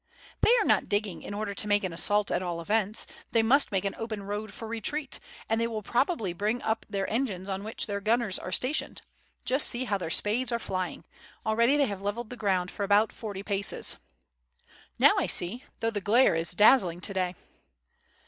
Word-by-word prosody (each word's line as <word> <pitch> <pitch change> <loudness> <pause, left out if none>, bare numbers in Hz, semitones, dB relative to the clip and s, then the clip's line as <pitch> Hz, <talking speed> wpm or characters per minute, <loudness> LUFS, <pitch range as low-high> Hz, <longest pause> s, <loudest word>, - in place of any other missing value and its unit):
"They - - +5
are - - +1
not - - +2
digging 205 -3 -1
in 205 - -6
order 205 -1 -3
to 210 - -1
make 205 0 +2
an 185 -3 -2
assault 205 +4 +2
at - - +1
all 175 -2 -3
events; 210 +4 +1 0.3
they 230 - +4
must 275 +6 +4
make 195 -1 0
an 195 - -1
open 220 -3 -4
road 205 +1 -4
for 225 +1 -8
retreat, 250 +6 -3 0.3
and 225 +1 +1
they 230 - +1
will 220 -2 -4
probably 240 - 0
bring 210 +7 -1
up 220 0 -1
their 195 -2 -2
engines 210 -6 -2
on 195 0 -3
which 220 +1 -4
their 200 -2 -3
gunners 220 -1 +1
are 185 - -6
stationed; 260 +9 -1 0.4
just 265 +3 +2
see 240 +1 -3
how 205 -5 -1
their 170 - -4
spades 230 +8 0
are 235 - +1
flying; 185 -6 -4 0.4
already 235 +6 +3
they 285 - +4
have 200 -5 -4
leveled 215 +4 -3
the - - -5
ground 190 -5 0
for 205 - -4
about 205 +2 +3
forty 200 -3 -6
paces." 200 -1 0 1.0
"Now - - +7
I - - 0
see, 230 +11 0 0.2
though 225 - +1
the 205 -2 -3
glare 230 +5 +4
is 165 +2 0
dazzling 185 -4 +5
to 200 - -4
day." 185 -1 -1
210 Hz, 205 wpm, -28 LUFS, 195-230 Hz, 1.0 s, Now